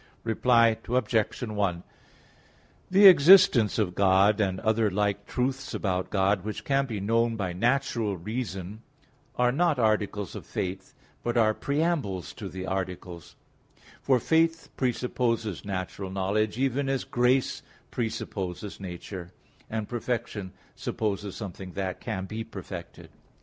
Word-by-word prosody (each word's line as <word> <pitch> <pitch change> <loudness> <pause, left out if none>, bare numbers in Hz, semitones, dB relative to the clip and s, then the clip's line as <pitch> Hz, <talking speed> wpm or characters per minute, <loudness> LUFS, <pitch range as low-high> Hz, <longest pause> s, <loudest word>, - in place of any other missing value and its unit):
Reply 115 0 +3
Obj. 115 -2 0
1: 100 -6 -1 1.1
The 195 +2 +6
existence 165 - +8
of 100 -5 0
God 100 +2 +4
and 95 -2 0
other 110 0 +2
like 100 +1 -1
truths 130 +2 -2
about 95 -2 -1
God, 95 -1 +1
which 105 0 -5
can 135 0 +1
be 110 -4 -4
known 115 +3 +1
by 95 -5 -3
natural 115 -1 0
reason, 105 0 -5 0.5
are 125 0 +3
not 165 +2 +2
articles 105 -3 0
of - - -7
faith, 95 0 -4 0.3
but 120 0 -1
are 110 -2 +4
preambles 140 - -1
to 100 -4 -7
the 95 +1 -6
articles; 90 -3 -5 0.7
for 130 -2 +3
faith 165 +5 +1
presupposes 115 - -1
natural 95 0 -4
knowledge, 100 +3 0
even 135 +1 0
as 135 -2 0
grace 125 +2 +1 0.3
presupposes 105 -4 -4
nature, 90 -1 -7 0.4
and 110 -2 -3
perfection 115 -5 -3 0.2
supposes 100 -2 -3
something 95 -3 -7
that 95 -2 -4
can 95 0 -3
be 110 +3 -5
perfected. 95 -5 -9
110 Hz, 125 wpm, -27 LUFS, 95-125 Hz, 1.1 s, existence